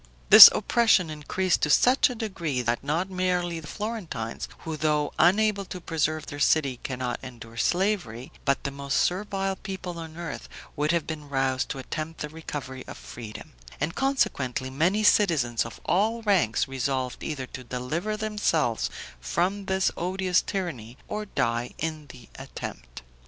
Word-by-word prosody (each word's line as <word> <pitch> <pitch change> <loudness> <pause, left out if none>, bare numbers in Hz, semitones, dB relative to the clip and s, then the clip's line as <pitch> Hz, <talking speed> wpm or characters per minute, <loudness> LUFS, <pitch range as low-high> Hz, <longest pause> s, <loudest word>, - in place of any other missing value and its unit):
This - - +14
oppression 220 -8 +3
increased 170 +5 -1
to 150 - +1
such 250 - +5
a 250 - -5
degree, 170 - -3
that 120 +1 -1
not 165 +7 -1
merely 180 -2 -1
the 155 - -10
Florentines, 185 - -5
who 160 -1 -4
though 150 -1 0
unable 200 +4 +3
to 180 - -7
preserve 155 -2 -1
their 145 - -7
liberty 140 -4 +2
cannot 125 -2 -3
endure 115 -3 -10
slavery, 170 - -1
but 140 -1 +1
the 140 - -2
most 140 0 -2
servile 195 +1 0
people 180 -3 -6
on 160 0 -9
earth 170 -1 -6 0.3
would 150 +1 +1
have 170 -3 0
been 150 -2 -6
roused 135 -1 0
to - - -4
attempt 155 +4 -5
the 150 - -3
recovery 145 -4 -7
of - - -8
freedom; 110 -3 -10 0.3
and 150 +4 -1
consequently 135 - 0
many 175 +10 +1
citizens 145 - +3
of 115 - -11
all 220 +5 +1
ranks 185 - +2
resolved 130 -1 -2
either 145 -5 -4
to 130 0 -9
deliver 150 - -3
themselves 205 - 0 0.3
from 180 - -1
this 190 0 +1
odious 185 +1 +1
tyranny 140 - -5
or 210 0 -4
die 120 -7 -1
in 155 -2 -4
the 120 -4 -13
attempt. - - -8
155 Hz, 155 wpm, -26 LUFS, 130-190 Hz, 0.3 s, This